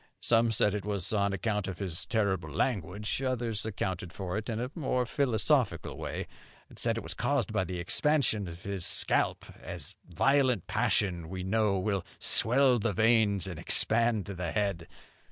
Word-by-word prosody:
Some 115 0 +3
said 105 -2 +2
it 105 -2 -3
was 100 -1 -2
on 100 -1 +2
account 105 +1 -1
of 95 -2 -5
his 90 -4 -3
terrible 95 -8 0
language; 100 - -1
others 120 -5 -1
accounted 95 -4 -3
for 90 0 -5
it 110 +2 -3
in 110 -1 -2
a 125 +2 -3
more 130 -5 0
philosophical 120 - +1
way, - - -4 0.4
and - - -9
said - - +2
it - - -4
was - - -5
caused - - 0
by 95 - +1
the 90 0 -5
expansion 110 - +1
of 85 +1 -9
his 100 -3 -3
scalp, - - +1 0.2
as - - -5 0.2
violent 130 - +2
passion, 85 -5 0
we 95 0 -5
know, 105 0 +1
will 95 -1 -1
swell 125 +1 +3
the 105 0 0
veins 110 -1 +3
and 90 -5 -6
expand 115 -3 +2
the 90 -4 -4
head. 100 -6 -1
105 Hz, 170 wpm, -30 LUFS, 95-115 Hz, 0.4 s, Some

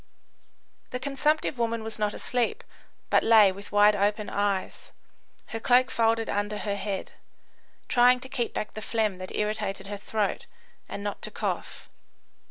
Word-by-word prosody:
The 250 - -4
consumptive 285 0 0
woman 230 -1 -1
was 220 0 -4
not 210 -1 0
asleep, 250 - -1 0.5
but - - +5
lay 220 -3 +6
with 200 +2 -11
wide 205 0 +5
open 205 +1 0
eyes, 200 -2 -2 0.6
her 225 - -4
cloak 250 +2 +4
folded 225 0 +2
under 205 +1 -1
her 205 -1 -2
head, 195 -1 -4 0.8
trying 250 0 +5
to 260 - -7
keep 255 -3 -2
back 215 - -4
the 215 - -6
phlegm 215 -3 -1
that 185 - -6
irritated 210 -2 -2
her 205 +1 -5
throat, 205 0 -2 0.4
and 200 - -5
not 205 -1 -4
to - - -4
cough. - - -4
215 Hz, 155 wpm, -27 LUFS, 205-240 Hz, 0.8 s, lay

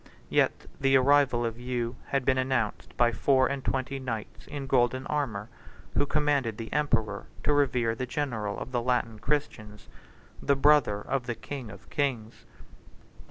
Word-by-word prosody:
Yet - - +2
the 135 -1 +5
arrival 135 -2 +4
of 115 0 -3
Hugh 120 -1 -2
had 135 -2 0
been 130 -1 +3
announced 130 -4 -1
by 120 -1 +4
four 130 +4 +3
and 135 -1 -2
twenty 135 +1 -2
knights 115 -5 -6
in 145 -2 -5
golden 130 0 +2
armor, 115 -9 -2 0.5
who 145 - +1
commanded 140 -7 +1
the 115 -1 -6
emperor 115 -9 0 0.2
to 150 - +3
revere 125 -5 +2
the 125 +3 -4
general 115 -8 -2
of 125 - -6
the 120 -2 0
Latin 120 -3 0
Christians, 110 -7 -3 0.5
the 140 - +3
brother 135 -7 +4
of 130 +2 -2
the 120 - -2
king 125 0 -7
of 100 -2 -12
kings. 120 -6 -2
130 Hz, 160 wpm, -28 LUFS, 115-140 Hz, 0.5 s, the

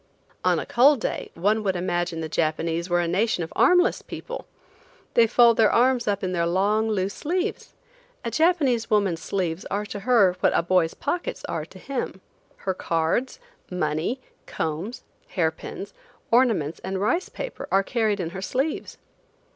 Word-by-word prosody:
On - - +3
a - - -3
cold 275 +3 +5
day - - -3
one 205 +6 +1
would 195 -3 0
imagine 175 -2 -1
the 160 - -3
Japanese 165 +2 -1
were 175 0 +3
a 170 - -1
nation 190 +1 +1
of 160 - -8
armless 360 0 +4
people. - - -7 0.7
They 230 -1 +5
fold 235 0 +5
their 220 -2 +5
arms 245 -1 +3
up 200 -1 0
in 185 - -1
their 170 -2 0
long, 205 +5 +2
loose 200 -2 -1
sleeves. 365 +6 -3 0.5
A - - -2
Japanese 300 -9 +2
woman's 195 -6 +2
sleeves 175 -1 -2
are 205 +1 -2
to 205 0 -6
her 200 -4 +4
what - - +3
a - - +2
boy's 175 -2 +2
pockets 360 +8 -3
are - - -3
to - - -15
him. 255 -8 -4 0.4
Her 190 - -2
cards, 170 - -1 0.3
money, 180 - -1 0.3
combs, 165 +10 -4 0.2
hair - - +1
pins, - - -8 0.4
ornaments 225 - +2
and 190 0 -3
rice 335 - 0
paper - - -6
are 195 +1 +4
carried 215 -1 0
in 170 -2 -3
her 190 - -6
sleeves. 265 +10 -2
200 Hz, 165 wpm, -25 LUFS, 175-240 Hz, 0.7 s, cold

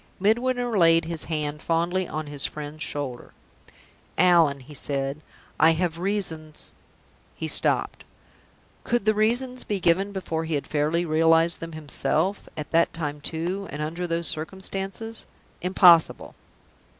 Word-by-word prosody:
Midwinter 240 +3 +1
laid 165 -1 +5
his 165 -1 -2
hand 150 -2 -3
fondly 170 +2 0
on 155 0 -4
his 145 -1 -4
friend's 150 0 -5
shoulder. 135 -4 -4 0.8
"Allan," 165 -6 +4
he 140 +4 -13
said, 140 +1 -3 0.4
"I 160 +2 +6
have 165 0 -1
reasons 170 -6 -3 0.3
" - - -34
He - - -4
stopped. - - +1 0.8
Could 240 -3 0
the 215 - +4
reasons 245 +4 0
be 205 -2 -2
given 185 +3 +2
before 165 -4 -3
he 160 -1 -1
had 145 - -2
fairly 155 +3 0
realized 165 +1 +3
them 165 0 -7
himself; 155 +5 -1
at 150 - -6
that 165 0 +3
time, 150 -3 -4
too, 175 +6 -2
and 145 - -6
under 170 +3 -3
those 165 -1 -2
circumstances? 195 +6 -4 0.3
Impossible! 180 -2 +5
165 Hz, 140 wpm, -25 LUFS, 155-190 Hz, 0.8 s, I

